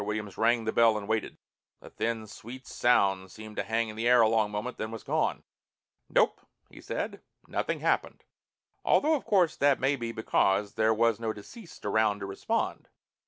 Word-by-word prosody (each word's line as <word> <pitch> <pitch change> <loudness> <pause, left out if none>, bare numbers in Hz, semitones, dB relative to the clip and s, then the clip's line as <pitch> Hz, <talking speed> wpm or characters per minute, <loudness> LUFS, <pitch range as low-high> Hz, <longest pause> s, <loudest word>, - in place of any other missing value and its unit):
Williams 105 -1 -4
rang 120 -1 +2
the 110 - -1
bell 115 -2 +4
and 100 -1 -6
waited. 110 0 -2 0.4
The - - -14
thin, 115 -1 -2
sweet 125 +5 -10
sound 95 -6 +2
seemed 110 0 -10
to - - +1
hang 115 +3 0
in 110 - -8
the 115 +2 -1
air 125 -1 +6
a 110 - +6
long 110 -1 +2
moment, 105 +5 -4
then 110 - -3
was 115 0 -8
gone. 155 +2 0 0.7
"Nope," - - +2 0.3
he - - -13
said. - - -4 0.3
"Nothing - - -2
happened. - - 0 0.6
Although, 310 +2 +3
of 295 - -1
course, 185 -6 +3
that 140 -1 +3
may 135 +2 +2
be 120 -3 -4
because 105 -2 +1
there 110 0 +2
was 115 0 +2
no 110 -1 -2
deceased 165 - -12
around 105 0 +2
to - - -3
respond." 100 0 -2
110 Hz, 185 wpm, -29 LUFS, 105-120 Hz, 0.7 s, air